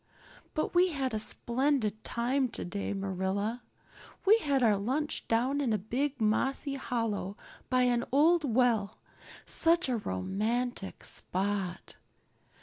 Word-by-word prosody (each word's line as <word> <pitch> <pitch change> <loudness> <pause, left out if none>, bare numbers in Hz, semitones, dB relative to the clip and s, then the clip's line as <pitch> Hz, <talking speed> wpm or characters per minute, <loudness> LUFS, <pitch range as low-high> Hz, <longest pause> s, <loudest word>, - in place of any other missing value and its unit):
But 310 - -1
we 355 +1 +5
had 265 -4 -2
a 215 - 0
splendid 235 -2 0
time 255 +2 0
today, 200 -1 -4
Marilla. 195 +4 -2 0.6
We 430 +3 +6
had 280 - +1
our 215 -3 +5
lunch 265 +10 -2
down 255 +5 +1
in 245 -6 +1
a - - +2
big 260 +7 -2
mossy 270 +6 0
hollow 230 -6 -3 0.3
by 255 -1 +3
an 245 -1 +2
old 315 +5 +4
well 235 -5 +1 0.5
such 335 -2 +4
a 245 - +1
romantic 210 - -2
spot. 190 -1 -2
240 Hz, 125 wpm, -30 LUFS, 205-275 Hz, 0.6 s, We